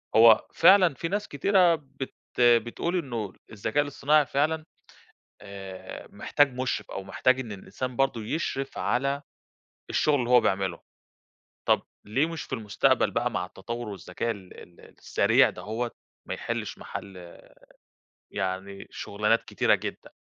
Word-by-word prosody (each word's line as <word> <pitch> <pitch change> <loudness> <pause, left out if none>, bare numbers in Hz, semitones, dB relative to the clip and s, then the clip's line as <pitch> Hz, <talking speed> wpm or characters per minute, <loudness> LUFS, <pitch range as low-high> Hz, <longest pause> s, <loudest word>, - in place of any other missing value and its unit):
هو 115 0 +7
فعلًا 180 -1 +6
في 150 +5 -4
ناس 205 +4 -2
كتيرة 180 +3 +4
بت 135 -3 -8 0.3
بتقول 120 +8 +3
إنه 115 - -3 0.2
الذكاء 110 +6 0
الاصطناعي 145 +1 +2
فعلًا 155 +3 0 0.8
آآ، 95 -2 -9
محتاج 145 -2 +2
مُشرف 130 0 -2
أو - - -5
محتاج 130 +7 +2
إن 115 -5 -6
الإنسان 120 +6 -6
برضو 135 -3 +1
يشرِف 135 +3 -3
على 140 +3 0 0.7
الشغل 150 - +2
اللي 120 -1 -2
هو 125 -1 +7
بيعمله، 95 -1 0 0.9
طب - - +4 0.2
ليه 130 +9 +1
مش 165 -3 -5
في - - -8
المستقبل 105 -2 +2
بقى، - - 0
مع - - -2
التطور 115 +4 -6
والذكاء 100 +3 -3
ال 95 -4 -10
ال 85 - -19 0.2
السريع - - +4
ده - - -9
هو، 115 +3 -3 0.4
ما - - -2
يحلّش - - -4
محَل 90 -3 -9 0.9
يعني 95 +1 -4
شغلانات 105 +3 0
كتيرة - - +2
جدًا؟ - - -5
120 Hz, 135 wpm, -27 LUFS, 100-145 Hz, 0.9 s, هو